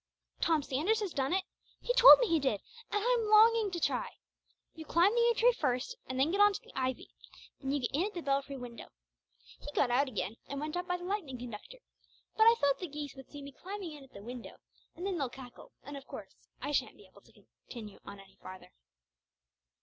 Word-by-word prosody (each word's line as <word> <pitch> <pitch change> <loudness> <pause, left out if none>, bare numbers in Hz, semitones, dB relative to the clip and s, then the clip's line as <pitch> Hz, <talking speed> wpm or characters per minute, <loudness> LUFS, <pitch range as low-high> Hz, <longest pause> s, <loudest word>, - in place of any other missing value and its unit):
"Tom 320 -3 +2
Sanders 320 +13 0
has 395 -5 -3
done 270 +1 -1
it. 375 +1 +1 0.4
He - - -1
told - - +10
me - - +1
he 330 -3 +2
did, 265 -8 0 0.3
and 415 +1 -1
I'm 485 -2 +2
longing 440 0 +6
to 355 -2 -4
try. 485 +8 0 0.6
You 320 - -9
climb 345 +6 +3
the 475 - +2
yew 470 0 +4
tree 485 +2 +5
first, 265 - -1
and 260 0 -4
then 285 +5 +3
get 400 +2 +2
on 410 0 +6
to - - -4
the - - -18
ivy. 260 -1 -3 0.5
Then 270 -1 -3
you 285 -1 0
get 245 - -2
in 335 +8 +1
at 420 - -10
the 345 - -5
belfry 275 0 -1
window. 245 -2 -9 0.7
He 290 - -8
got 245 - +2
out 275 +4 +3
again 215 -3 -4
and 280 - -5
went 305 +2 -4
up 355 0 -3
by 360 -1 0
the 350 - -11
lightning 360 -9 -3
conductor, 245 - -9 0.6
but 440 0 +5
I 460 - +8
thought 280 -1 +2
the 360 - -4
geese 290 -1 -6
would 270 -1 -13
see 290 -1 -9
me 280 - -9
climbing 375 +3 -7
in 290 -2 -11
at 270 - -18
the 200 - -11
window 245 +1 -9 0.4
and 355 - -6
then 380 -4 -1
they'll 275 -3 -1
cackle 250 -1 -12
and 285 +2 -8
of 275 -1 -10
course - - -9 0.3
I 290 - -4
shan't 290 - -1
be - - -16
able - - -20
to - - -23 0.3
come 215 -5 -9
on 200 - -10
any 195 0 -17
further." 185 0 -11
295 Hz, 230 wpm, -32 LUFS, 260-400 Hz, 0.7 s, told